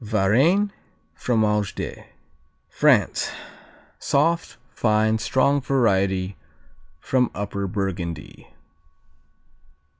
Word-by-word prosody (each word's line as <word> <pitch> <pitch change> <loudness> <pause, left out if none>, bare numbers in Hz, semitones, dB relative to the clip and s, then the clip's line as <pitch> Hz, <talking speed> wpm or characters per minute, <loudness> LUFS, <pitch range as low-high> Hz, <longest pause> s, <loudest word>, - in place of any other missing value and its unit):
Varennes, 125 - +2 0.4
Fromage 105 -4 0
de - - -6 0.6
France - - +2 0.7
Soft, 165 +2 0 0.2
fine, 110 0 +2
strong 140 +5 +2
variety 100 -8 +1 0.6
from 125 +4 +1
Upper 100 -1 -3
Burgundy. 90 -6 -5
110 Hz, 65 wpm, -23 LUFS, 95-130 Hz, 0.7 s, Varennes